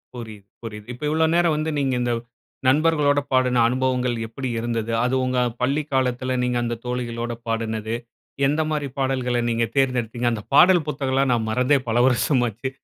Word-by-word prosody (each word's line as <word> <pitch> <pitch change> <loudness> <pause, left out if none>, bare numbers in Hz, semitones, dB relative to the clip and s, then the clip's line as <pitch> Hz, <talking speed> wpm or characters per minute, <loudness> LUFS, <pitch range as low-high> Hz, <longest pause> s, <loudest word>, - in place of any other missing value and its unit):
புரியுது, 110 -4 -9 0.2
புரியுது. 105 -2 -7
இப்ப 125 - -11
இவ்ளோ 160 +1 +3
நேரம் 170 -3 +3
வந்து 155 +1 -1
நீங்க 135 -2 0
இந்த, 120 -1 0 0.5
நண்பர்களோட 145 0 +3
பாடுன 125 -2 +3
அனுபவங்கள் 125 0 0
எப்படி 125 +3 -5
இருந்தது. 115 -1 -2
அது 125 +1 +1
உங்க 130 0 0 0.2
பள்ளி 140 +4 +1
காலத்துல 130 0 0
நீங்க 125 0 0
அந்த 120 0 -2
தோழிகளோட 120 -1 -3
பாடுனது. 110 0 -2 0.5
எந்த 150 +3 +1
மாதிரி 150 -2 -1
பாடல்கள 130 -2 0
நீங்க 115 0 +1
தேர்ந்தெடுத்தீங்க, 125 -3 0
அந்த 110 -3 -4
பாடல் 175 +1 +6
புத்தகம்லாம் 135 -2 0
நான் 110 -2 -1
மறந்தே 125 +5 +3
பல 115 +1 0
வருஷம் 125 +1 +2
ஆச்சு. 120 +5 -4
125 Hz, 160 wpm, -23 LUFS, 120-135 Hz, 0.5 s, பாடல்